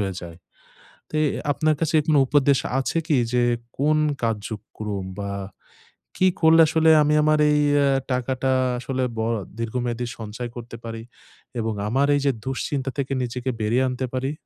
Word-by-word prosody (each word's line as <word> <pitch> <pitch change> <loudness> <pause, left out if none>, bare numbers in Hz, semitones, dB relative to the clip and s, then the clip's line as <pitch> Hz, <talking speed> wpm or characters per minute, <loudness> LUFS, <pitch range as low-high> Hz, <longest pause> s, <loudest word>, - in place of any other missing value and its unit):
হয়ে 95 -2 -1
যায়। 85 -1 -9 0.7
তো - - -15
এ - - +3 0.3
আপনার 155 +1 +1
কাছে 165 0 -1
কোনো 155 -3 +4
উপদেশ 140 0 +3 0.2
আছে 135 +5 -1
কি? 150 - +3 0.2
যে 125 0 +3 0.4
কোন 150 +2 +3 0.2
কার্যক্রম 105 -2 -4 0.2
বা 100 0 -4 0.9
কি 185 - +4
করলে 160 0 +7
আসলে 160 +1 +3
আমি 150 - +2
আমার 155 0 +3
এই 150 0 +3 0.2
অ্যা 140 -1 +3 0.2
টাকাটা 130 +1 0 0.3
আসলে 130 +1 -2
ব - - -2 0.4
দীর্ঘমেয়াদী 120 +1 -2
সঞ্চয় 115 +2 -6
করতে 120 -1 -8
পারি? 115 0 -6 0.6
এবং 110 0 -1
আমার 135 +5 +2
এইযে 140 -1 +2
দুশ্চিন্তা 135 +1 -2
থেকে 140 -1 -2
নিজেকে 125 +1 -3
বেরিয়ে 120 +5 +2
আনতে 130 +1 -2
পারি? 130 +2 -1
130 Hz, 155 wpm, -23 LUFS, 115-145 Hz, 0.9 s, করলে